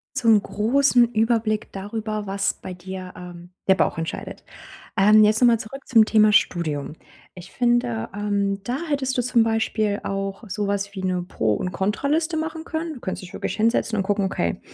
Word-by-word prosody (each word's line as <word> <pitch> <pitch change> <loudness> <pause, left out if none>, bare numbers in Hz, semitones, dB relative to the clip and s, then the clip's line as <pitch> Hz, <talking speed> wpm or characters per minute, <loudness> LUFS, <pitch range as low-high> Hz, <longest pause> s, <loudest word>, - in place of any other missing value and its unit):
Zum 230 -6 +4
großen 245 +3 +3
Überblick 220 -1 +1
darüber, 215 +1 -4
was 195 0 -1
bei 185 - -8
dir, 185 0 -8
ähm, 175 -1 -10 0.2
der 190 - +6
Bauch - - +1
entscheidet. 165 0 -5 0.5
Ähm, 210 +2 +6
jetzt 215 +1 +4
nochmal 235 -2 +5
zurück 275 +5 -8
zum 225 -3 +6
Thema 215 -1 +4
Studium. 155 -7 +1 0.4
Ich 180 0 -12
finde, 240 - 0
ähm, 200 -1 -1
da 245 +4 -2
hättest 265 -3 -1
du 245 - +1
zum 235 -1 +3
Beispiel 220 -2 0
auch 195 +1 -4
sowas 200 0 -2
wie 190 - -5
'ne 185 -1 0
Pro 110 -11 -1
und 180 - -3
Kontra-Liste 290 - -1
machen 320 0 -4
können. 325 0 -4
Du 255 - -11
könntest 185 - -5
dich 185 - -11
wirklich - - -3
hinsetzen 225 0 +1
und 200 - +1
gucken: 200 +1 0
„Okay, 85 - -2
210 Hz, 175 wpm, -23 LUFS, 190-235 Hz, 0.5 s, der